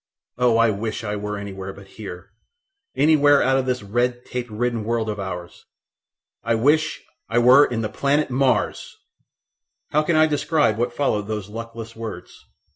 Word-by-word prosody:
Oh, 120 -2 +4
I 115 -1 +4
wish 110 +2 -4
I 105 -1 -3
were 105 0 -4
anywhere 95 -1 -6
but 100 - -13
here, 95 -4 -9 0.6
anywhere 145 -1 +5
out 135 +1 +3
of 130 - -3
this 125 -3 -1
redtape 120 +3 -2
ridden 115 +1 -2
world 115 0 -1
of 105 - -6
ours! 90 -3 -7 0.8
I 115 +1 +1
WISH 150 +7 +1 0.3
I 115 - 0
WERE 125 +4 +7
IN 115 -2 -3
THE 110 - -2
PLANET 140 0 0
MARS!" 130 0 0 0.9
How 150 - +3
can 160 +2 0
I 155 0 +6
describe 145 -6 +1
what 120 +1 0
followed 110 -6 -1
those 105 -2 -4
luckless 115 0 -8
words? 115 -1 -7
115 Hz, 160 wpm, -22 LUFS, 105-135 Hz, 0.9 s, WERE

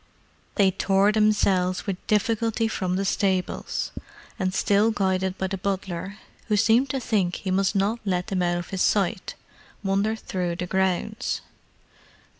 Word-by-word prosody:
They 195 -3 +4
tore 195 +2 +3
themselves 200 -4 +2
with 190 -2 -5
difficulty 225 +1 +1
from 185 -4 -2
the 195 +1 -1
stables, 190 -2 -1 0.5
and, 185 -1 0
still 205 +3 +3
guided 190 -3 0
by 190 - -1
the 190 0 -3
butler, 195 0 -3 0.3
who 210 -2 +2
seemed 230 +5 +4
to 270 - -1
think 200 -7 0
he 190 - -4
must 195 +2 +1
not 200 +4 +1
let 180 -3 0
them 195 -4 -1
out 175 0 +1
of 175 - -6
his 190 -1 -2
sight, 200 -1 +1 0.5
wandered 200 +3 +1
through 180 -5 -3
the 180 - -3
grounds. 190 +5 -1
195 Hz, 150 wpm, -25 LUFS, 185-215 Hz, 0.5 s, They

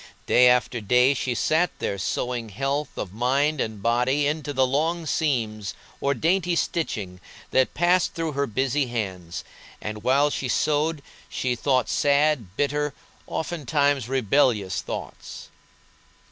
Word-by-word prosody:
Day 125 0 +5
after 125 -1 +2
day 125 +6 +4
she 125 -2 -2
sat 160 +8 +2
there 100 - -3
sewing 120 +3 -2
health 135 +6 -2
of 95 -2 -5
mind 135 +6 +1
and 110 -3 -4
body 125 +5 +2
into 150 0 -1
the 130 -2 +2
long 160 +6 0
seams 110 - -1 0.2
or 140 0 +1
dainty 175 +6 +1
stitching 105 - -2 0.3
that 130 -1 +2
passed 175 +2 +2
through 165 -1 -2
her 140 0 -1
busy 130 +4 0
hands, 95 -8 -4 0.4
and 105 0 -6
while 140 +5 +3
she 135 - -2
sewed 150 +4 0 0.3
she 125 -1 -1
thought 130 0 +1
sad, 140 -9 +1
bitter, 145 0 0 0.3
oftentimes 145 -5 0
rebellious 120 -6 +2
thoughts. - - -7
135 Hz, 130 wpm, -24 LUFS, 115-150 Hz, 0.4 s, Day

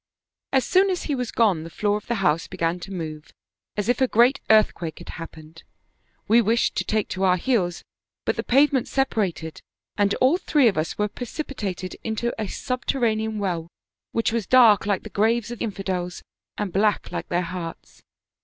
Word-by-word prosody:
As 265 -2 +2
soon 380 +6 +4
as 365 -2 -1
he 295 - -2
was 250 -3 -2
gone 205 -8 +2
the 165 - -8
floor 205 +5 0
of 210 - -6
the 235 - 0
house 155 +1 +2
began 165 +1 -1
to 195 - -9
move 155 -4 -6 0.5
as 210 - -1
if 245 +2 +1
a 260 - +5
great 245 +4 +4
earthquake 215 -7 +3
had - - -11
happened. 160 0 -10 0.7
We 230 +3 +6
wished 230 +2 +2
to - - +1
take 215 -1 0
to 190 - -3
our 185 -1 +4
heels, 185 -5 0 0.4
but - - +1
the - - -1
pavement 275 0 +3
separated, 200 - -1 0.4
and 200 -1 +3
all 265 +7 +3
three 295 -8 +3
of 205 - +2
us 155 +1 -2
were 210 - +1
precipitated 210 - -5
into 225 +1 -2
a 215 - -2
subterranean 220 -3 -1
well 175 -5 -2 0.4
which 230 0 0
was 230 -5 -1
dark 230 -6 +6
like 200 -2 0
the 215 - -8
graves 225 +2 +1
of 240 - -7
infidels, 190 -4 -3 0.3
and 200 -4 -3
black 205 +1 +1
like - - -5
their 175 +1 +1
hearts. 170 -1 -7
210 Hz, 180 wpm, -24 LUFS, 180-240 Hz, 0.7 s, We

